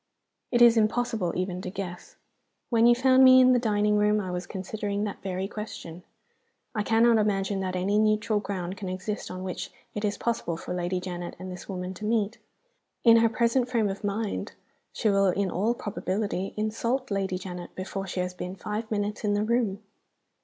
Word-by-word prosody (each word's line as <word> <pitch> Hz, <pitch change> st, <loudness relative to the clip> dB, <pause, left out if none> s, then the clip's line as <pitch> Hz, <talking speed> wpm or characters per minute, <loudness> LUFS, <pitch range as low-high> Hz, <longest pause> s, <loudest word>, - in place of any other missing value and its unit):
"It 240 Hz, -1 st, +5 dB
is 235 Hz, -1 st, +7 dB
impossible 220 Hz, -4 st, +1 dB
even 185 Hz, 0 st, -2 dB
to 185 Hz, -, -5 dB
guess. 180 Hz, -1 st, -7 dB, 0.6 s
When 230 Hz, 0 st, +5 dB
you 240 Hz, -, +6 dB
found 260 Hz, +1 st, +5 dB
me 260 Hz, 0 st, +9 dB
in 255 Hz, 0 st, +6 dB
the 245 Hz, -, +4 dB
dining 210 Hz, -2 st, +2 dB
room 210 Hz, 0 st, +3 dB
I 185 Hz, -3 st, -3 dB
was 180 Hz, 0 st, -4 dB
considering 205 Hz, +1 st, -3 dB
that 205 Hz, -2 st, -4 dB
very 190 Hz, 0 st, -3 dB
question. 200 Hz, -5 st, -7 dB, 0.7 s
I 215 Hz, -, 0 dB
cannot 225 Hz, +1 st, +4 dB
imagine 200 Hz, -1 st, 0 dB
that 185 Hz, -1 st, -2 dB
any 195 Hz, +3 st, +1 dB
neutral 215 Hz, 0 st, +2 dB
ground 190 Hz, -2 st, -4 dB
can 190 Hz, -2 st, -5 dB
exist 190 Hz, +3 st, -4 dB
on 185 Hz, 0 st, -6 dB
which 185 Hz, -1 st, -4 dB, 0.2 s
it 210 Hz, -, -4 dB
is 205 Hz, -1 st, 0 dB
possible 225 Hz, -8 st, -2 dB
for 170 Hz, -, -6 dB
Lady 180 Hz, +1 st, -1 dB
Janet 175 Hz, -1 st, -6 dB
and 185 Hz, 0 st, -7 dB
this 180 Hz, -, -9 dB
woman 185 Hz, -1 st, -4 dB
to 210 Hz, -, -7 dB
meet. 220 Hz, 0 st, 0 dB, 0.6 s
In 230 Hz, -1 st, +8 dB
her 230 Hz, 0 st, +4 dB
present 235 Hz, +2 st, +1 dB
frame 225 Hz, -5 st, +1 dB
of 195 Hz, +2 st, -6 dB
mind 205 Hz, +1 st, -2 dB, 0.4 s
she 225 Hz, -, -1 dB
will 195 Hz, -1 st, +4 dB
in 190 Hz, 0 st, 0 dB
all 215 Hz, +7 st, +1 dB
probability 200 Hz, -2 st, -3 dB
insult 230 Hz, +4 st, -1 dB
Lady 195 Hz, -2 st, -1 dB
Janet 180 Hz, -1 st, -8 dB
before 195 Hz, +1 st, -4 dB
she 180 Hz, 0 st, -2 dB
has 180 Hz, 0 st, -3 dB
been 180 Hz, +1 st, -6 dB
five 210 Hz, +4 st, -4 dB
minutes 210 Hz, 0 st, -2 dB
in 205 Hz, -1 st, +1 dB
the 205 Hz, -, +1 dB
room. 220 Hz, -3 st, 0 dB
205 Hz, 190 wpm, -27 LUFS, 185-225 Hz, 0.7 s, me